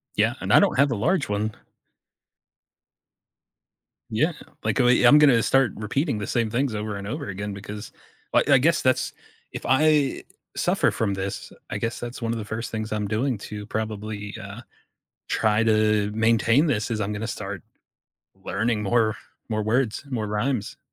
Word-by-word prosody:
Yeah, - - +2
and - - -2
I - - +8
don't - - +2
have 140 0 +5
the 120 - -1
large 145 - 0
one. 105 +1 -1 2.6
Yeah. 155 +10 +1 0.3
Like, - - 0
uh, 125 - +4
I'm 125 +4 +6
gonna 130 -6 +6
start 135 0 +3
repeating 130 +4 -1
the 105 - -4
same 115 -3 0
things 125 +1 0
over 105 0 -3
and 100 0 -6
over 145 +2 -4
again 100 +1 -4
because 105 +1 -8 0.4
I - - +5
I 140 -2 +7
guess 165 +6 +2
that's 130 0 +1 0.4
if - - -7
I 145 0 +3 0.3
suffer - - +2
from 105 -3 -1
this, 95 0 -5 0.2
I - - -3
guess 115 +1 -3
that's 120 +1 -7
one 115 0 -1
of 115 - -3
the 105 - -5
first 110 +1 -5
things 110 0 -4
I'm 105 -1 -1
doing 120 +3 0
to 105 0 -7
probably, 110 -1 -4
uh, 100 +3 -8 0.7
try 110 0 +2
to 110 -1 +2
maintain 115 +5 +3
this, 110 -4 0
is 110 - -1
I'm 105 +1 -2
gonna 110 +2 -4
start 95 -5 -5 0.8
learning 110 +1 -1
more 110 +1 +2 0.3
more 110 -1 -1
words, 115 +2 0
more 115 -5 -2
rhymes. 105 +1 -2
110 Hz, 170 wpm, -24 LUFS, 105-125 Hz, 2.6 s, I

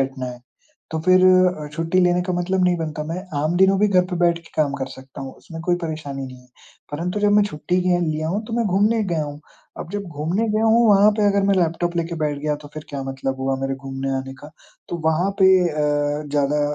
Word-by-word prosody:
बैठना 135 -1 -2
है, 125 -1 -8 0.5
तो 160 - -2
फिर 185 0 +6
अ, 185 -4 +3
छुट्टी 165 +3 0
लेने 180 0 +3
का 185 - -3
मतलब 180 +1 0
नहीं 180 -1 +3
बनता। 155 -2 -4
मैं 170 +4 -4 0.2
आम 165 +3 0
दिनों 190 +1 +4
भी 210 - +5
घर 180 -2 +3
पे 180 - -2
बैठ 170 -1 +3
के 170 - -18
काम 150 -3 +2
कर 135 - -3
सकता 130 +1 -12
हूँ, 135 - -7
उसमें 165 -1 -10
कोई 175 0 +1
परेशानी 150 -4 -5
नहीं 130 -1 -11
है। 125 - -24 0.4
परंतु 180 +7 -3
जब 205 0 +3
मैं 210 0 +5
छुट्टी 180 -2 -2
लिए 180 -1 +2
लिया 155 -1 -1
हूँ, 205 +5 -2
तो - - -8
मैं 235 0 +1
घूमने 210 +4 +2
गया 170 -4 -1
हूँ। 145 0 -8 0.4
अब 170 - -7
जब 205 - -2
घूमने 170 +8 -2
गया 215 +1 +1
हूँ, 230 +1 +4
वहाँ 205 +1 +6
पे 210 - +3
अगर 200 0 +2
मैं 200 - +4
लैपटॉप 175 0 0
लेके 170 0 -2
बैठ 145 -1 -1
गया, 150 +1 -1
तो 145 0 -13
फिर 155 - -7
क्या 140 -2 -5
मतलब 135 0 -3
हुआ 135 0 0
मेरे 135 0 -1
घूमने 135 0 -5
आने 135 0 -5
का? 150 - -11 0.4
तो 175 - -3
वहाँ 170 +5 +2
पे 190 - +7 0.2
अ, 150 -1 0
ज़्यादा 145 0 +1
165 Hz, 240 wpm, -21 LUFS, 145-185 Hz, 0.5 s, पे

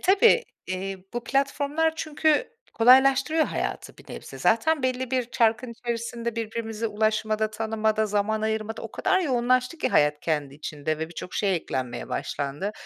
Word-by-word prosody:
tabii, 445 +5 +5 0.2
eee, 190 +1 -3 0.2
bu 240 - -3
platformlar 285 +3 +1
çünkü 310 +7 +1 0.2
kolaylaştırıyor 270 +6 +5
hayatı - - -4
bir - - -12
nebze. - - -9
Zaten 280 +7 +2
belli 255 0 -1
bir 250 -2 -1
çarkın 230 +1 +1
içerisinde, 235 0 -4
birbirimize 225 0 -3
ulaşmada, 215 0 0
tanımada, 220 0 0
zaman 210 +1 0
ayırmada 220 0 -2
o 225 - -6
kadar 380 0 +1
yoğunlaştı 255 0 +1
ki - - 0
hayat 150 0 +3
kendi 150 -4 -2
içinde 155 +1 -4
ve 160 0 -3
birçok 175 +1 -8
şey 195 -3 +1
eklenmeye 130 -6 -4
başlandı. 145 +9 -3
225 Hz, 145 wpm, -25 LUFS, 210-260 Hz, 0.2 s, tabii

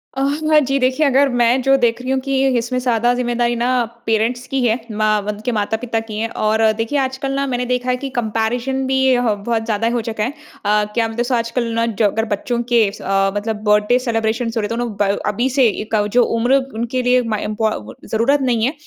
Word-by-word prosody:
अ, 270 - -2 0.3
हाँ 305 -1 +6
जी। 275 -1 0
देखिए 260 +4 +2
अगर 275 +1 +3
मैं 245 +1 +2
जो 270 +1 +4
देख 240 -1 +1
रही 255 +1 -3
हूँ 265 - +1
कि 270 0 +1
इसमें 240 +2 -2
ज़्यादा 240 -1 +1
ज़िम्मेदारी 240 -1 0
ना 240 +1 -1 0.4
पेरेंट्स 230 +3 0
की 270 0 -1
है। 225 +1 +2
माँ 215 0 +1
वध 210 +1 -5
के 245 - +1
माता-पिता 225 +2 -1
की 220 -1 -7
है। 225 - 0
और 220 0 0
अ, 220 -1 +5
देखिए 230 +6 -1
आजकल 265 +1 -2
ना 275 0 -1
मैंने 250 -1 -2
देखा 250 0 -1
है 250 - +2
कि 270 +1 -5
कम्पैरिज़न 240 +4 -1
भी 265 - 0
ये 260 -1 +4
ह 220 - +2
बहुत 225 -1 0
ज़्यादा 225 0 0
हो 240 - 0
चुका 220 -1 -3
है। 245 - 0 0.4
अ, 210 0 +3
क्या 230 -1 +1
मतलब 230 +2 -2
स 255 - -4
आजकल 230 +2 -1
ना 230 0 +1
जो 225 -2 0
अगर 220 +3 -1
बच्चों 230 +3 -2
के 225 -4 +4
स 205 - -12
अ, 195 0 +1
मतलब 210 +1 -3
बर्थडे 210 +4 +3
सेलेब्रेशन्स 230 -1 -1
हो - - +1
रहे 205 - -2
तो 230 - -2
नु 240 0 -2
ब 200 - +3 0.2
अभी 235 +6 0
से 260 -2 +3
एक 220 +1 -3
अ, 205 -1 +2
जो 245 +3 +3
उम्र 240 +4 +1 0.2
उनके 240 +3 -2
लिए 250 0 +3
माय 220 -3 -2
इम्पौ 215 +1 0
वो 110 +2 -11
ज़रूरत 260 +6 +1
नहीं 240 -3 +1
है, 275 - 0
235 Hz, 240 wpm, -18 LUFS, 220-255 Hz, 0.4 s, हाँ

